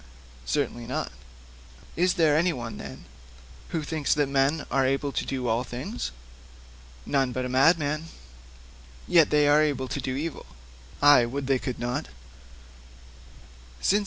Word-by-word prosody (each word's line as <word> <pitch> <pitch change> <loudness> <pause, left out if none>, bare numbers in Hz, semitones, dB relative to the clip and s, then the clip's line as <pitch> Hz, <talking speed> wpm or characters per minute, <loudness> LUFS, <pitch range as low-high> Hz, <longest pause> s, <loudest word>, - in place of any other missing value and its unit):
'Certainly 115 - -2
not.' 130 - -3 0.8
'Is 180 +2 +2
there 155 -3 +4
anyone, 150 - -1
then, - - -9 0.6
who 160 -2 -3
thinks 150 -1 0
that 145 -1 +2
men 140 +3 +1
are 135 - +2
able 135 +2 0
to - - -2
do 130 -2 -2
all 115 +2 +1
things?' 130 - -5 1.0
'None 135 -2 +1
but 130 +1 -3
a - - -2
madman.' 150 +3 +2 1.0
'Yet 165 -3 +5
they 150 -1 +4
are 145 +1 +5
able 140 -4 0
to 140 - -3
do 130 0 -3
evil?' 150 - -5 0.6
'Ay; 145 -5 +7
would 140 +3 -4
they 135 -1 +2
could 125 -1 -4
not!' 120 +5 -3
140 Hz, 135 wpm, -26 LUFS, 130-155 Hz, 1.0 s, Ay